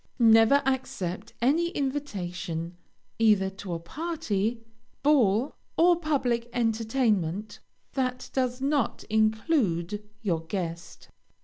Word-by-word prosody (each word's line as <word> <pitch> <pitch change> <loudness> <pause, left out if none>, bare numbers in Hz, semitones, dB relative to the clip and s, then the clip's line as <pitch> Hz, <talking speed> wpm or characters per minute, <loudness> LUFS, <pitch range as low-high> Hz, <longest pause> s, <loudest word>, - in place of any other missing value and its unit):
Never 225 +3 +6
accept 225 -7 -2
any 325 +7 +3
invitation, 180 - -3 0.4
either 210 -4 +4
to 190 -2 -6
a 165 - -3
party, 230 - -2 0.4
ball, 255 -4 +3 0.2
or 350 +1 +6
public 260 -8 0
entertainment, 220 -5 0 0.3
that 255 -2 -2
does 255 -1 -1
not 280 -3 0
include 215 - +1 0.2
your 170 -6 0
guest. 170 -2 -5
225 Hz, 95 wpm, -27 LUFS, 190-270 Hz, 0.4 s, Never